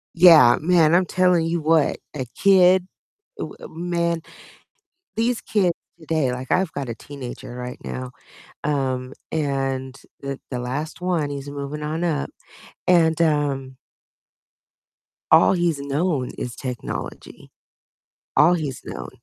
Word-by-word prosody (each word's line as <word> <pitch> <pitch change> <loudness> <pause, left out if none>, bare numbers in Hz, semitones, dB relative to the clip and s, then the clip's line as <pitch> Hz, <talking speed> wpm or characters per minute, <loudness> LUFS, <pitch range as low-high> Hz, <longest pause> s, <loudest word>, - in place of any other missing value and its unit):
Yeah, 165 -8 +8
man, 165 -1 +4
I'm 185 - +4
telling 180 -2 +2
you 170 0 -1
what, 160 -1 +3 0.2
a 130 - -3
kid, 185 -1 +5 0.5
uh, - - -2 0.2
uh, - - -8
man, 170 0 -1 0.9
these 230 +1 +1
kids 195 -5 +1 0.3
today, 155 -5 0
like 125 +1 -6
I've 185 -3 +1
got 140 -3 -4
a 115 - -3
teenager 125 -2 -9
right 125 0 -6
now, 130 0 -5 0.5
um, 130 -3 -1 0.2
and 135 -3 -2 0.2
the 140 -1 -5
the 125 - -3
last 135 +8 -4
one, 175 -5 0
he's 140 0 -6
moving 145 +1 -5
on 155 +3 -2
up, 155 -4 -1 0.6
and, 165 -3 +4
um 140 -4 0 1.5
all - - +7
he's 170 -5 +1
known 140 -1 -1
is 120 - -5
technology, 125 -3 -6 0.9
all 155 +4 +6
he's 145 -6 -4
known, - - -7
150 Hz, 130 wpm, -23 LUFS, 135-170 Hz, 1.5 s, Yeah